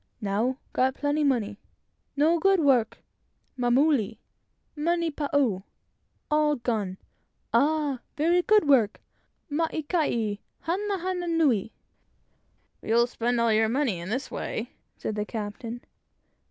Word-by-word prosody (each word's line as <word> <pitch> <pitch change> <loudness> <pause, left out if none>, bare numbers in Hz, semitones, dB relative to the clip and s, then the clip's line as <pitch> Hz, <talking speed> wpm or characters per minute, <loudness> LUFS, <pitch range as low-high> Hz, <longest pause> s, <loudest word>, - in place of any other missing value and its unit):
Now, 220 +5 0 0.2
got 260 +1 +2
plenty 295 +1 0
money; 225 -7 0 0.6
no 320 +4 +3
good, 390 +2 +4
work. 260 -7 +2 0.5
Mamule, 245 -3 +2 0.6
money 335 +2 0
pau 280 -10 0 0.7
all 300 0 +3
gone. 220 -7 -2 0.6
Ah! 295 -3 +2 0.2
very 340 +4 +3
good, 425 -2 +4
work! 235 -7 +4 0.5
maikai, 295 - 0 0.2
hana 395 +4 -1
hana 360 0 -3
nui!" 285 - +2 1.1
"But - - -10
you'll 235 +1 +5
spend 240 0 -1
all 230 -1 +3
your 220 0 +3
money 245 -7 0
in 170 +2 -6
this 255 +5 -3
way," 230 +3 -4 0.3
said - - -3
the 210 0 -1
captain. 225 +2 -6
265 Hz, 115 wpm, -27 LUFS, 225-310 Hz, 1.1 s, you'll